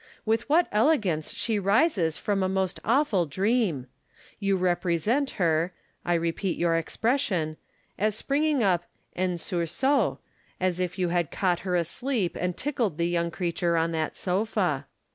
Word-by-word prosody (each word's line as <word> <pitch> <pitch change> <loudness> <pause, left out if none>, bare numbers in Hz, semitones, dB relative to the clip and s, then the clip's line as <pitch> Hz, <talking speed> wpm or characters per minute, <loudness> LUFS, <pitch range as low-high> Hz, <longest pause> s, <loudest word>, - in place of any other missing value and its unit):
With 225 +3 0
what 335 +4 +5
elegance 210 - +2
slie 225 -3 -1
rises 200 - +2
from 200 -2 -1
a 185 - +1
most 190 -1 -1
awful 225 - +2
dream! 190 - 0 0.5
You 195 -2 +1
represent 185 - +1
her 170 0 +1 0.3
(I 175 - +1
repeat 170 +3 -1
your 170 -1 +2
expression) 170 - 0 0.4
as 210 +1 +1
springing 285 +2 +1
up 175 -3 +2 0.3
en 185 0 0
sursaut, 175 - 0 0.4
as 185 -1 0
if 180 0 -2
you 180 -2 0
had 170 -3 0
caught 180 -3 0
her 180 -1 -2
asleep 195 - -1
and 180 0 -2
tickled 235 - -1
the 170 0 +1
young 170 -1 0
creature 170 -1 -1
on 165 +1 +1
that 160 -1 -2
sofa. 200 +5 0
185 Hz, 145 wpm, -27 LUFS, 170-225 Hz, 0.5 s, what